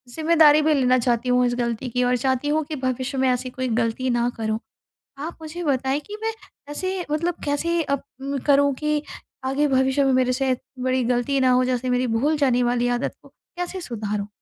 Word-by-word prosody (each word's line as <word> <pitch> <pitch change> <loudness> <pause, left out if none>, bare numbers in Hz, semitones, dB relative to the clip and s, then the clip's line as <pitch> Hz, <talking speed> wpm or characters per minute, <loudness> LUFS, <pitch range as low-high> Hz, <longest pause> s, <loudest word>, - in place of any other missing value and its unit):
जिम्मेदारी 310 -2 +5
भी 310 0 +3
लेना 255 -2 +3
चाहती 240 +1 0
हूँ 250 0 +4
इस 240 0 0
गलती 235 +1 -2
की 250 +1 0
और 250 0 +2
चाहती 260 +2 0
हूँ 310 +1 +1
कि 310 - -5
भविष्य 260 0 -2
में 260 0 +2
ऐसी 250 +1 -1
कोई 255 0 -3
गलती 230 +3 -1
ना 240 0 +1
करूँ। 220 0 -1 0.6
आप 320 +4 -5
मुझे 335 +2 -6
बताएँ 270 0 0
कि 420 - -6
मैं 450 0 0 0.4
ऐसे 370 +5 -3
मतलब 335 +3 0
कैसे 335 +4 0
अप 280 -2 -2 0.4
करूँ 285 0 +4
कि 300 -1 +1 0.4
आगे 270 +3 +1
भविष्य 265 +2 +2
में 270 - +3
मेरे 255 0 +2
से 265 +1 0
इतनी 255 0 -5
बड़ी 255 0 +1
गलती 245 +3 +1
ना 255 - +4
हो 255 0 +4
जैसे 255 0 -1
मेरी 250 0 +1
भूल 300 +5 +1
जाने 255 -4 +2
वाली 245 0 +1
आदत - - -3
को - - -16
कैसे 355 +1 -7
सुधारूँ? 210 - -4
260 Hz, 205 wpm, -23 LUFS, 250-295 Hz, 0.6 s, जिम्मेदारी